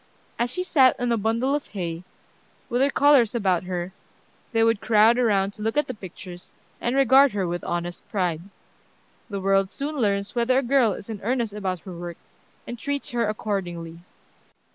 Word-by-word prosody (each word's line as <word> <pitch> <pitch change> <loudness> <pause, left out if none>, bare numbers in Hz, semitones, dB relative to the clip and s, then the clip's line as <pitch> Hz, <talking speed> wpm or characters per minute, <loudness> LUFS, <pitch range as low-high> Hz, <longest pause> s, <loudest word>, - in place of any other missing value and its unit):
As 240 +1 +1
she 365 +9 -3
sat 270 -8 +4
on 245 -1 0
a - - +3
bundle 230 +5 0
of 290 0 -2
hay, 170 -4 -5 0.7
with 245 +2 0
her 275 - +4
colors 275 -6 +4
about 190 -6 +1
her, 180 0 -4 0.6
they 225 -2 +2
would 225 -2 +2
crowd 225 +2 +4
around 200 -5 +2
to 210 - -12
look 225 +5 -1
at 295 - +3
the 255 - -5
pictures, 180 -3 -10 0.3
and 240 +2 0
regard 275 0 +5
her 200 -2 -1
with 175 +1 -3
honest 175 0 -3
pride. 180 -6 -1 0.9
The 200 -2 -3
world 195 0 +2
soon 290 +7 -5
learns 200 -4 0
whether 245 +2 +2
a 270 - +2
girl 245 -4 +3
is 195 - -9
in 220 -3 -6
earnest 235 -1 -1
about 190 -4 -3
her 185 -3 -9
work, 175 0 -7 0.5
and 240 -1 -7
treats 285 +2 -3
her 235 -2 0
accordingly. 175 -6 -4
215 Hz, 185 wpm, -24 LUFS, 185-245 Hz, 0.9 s, regard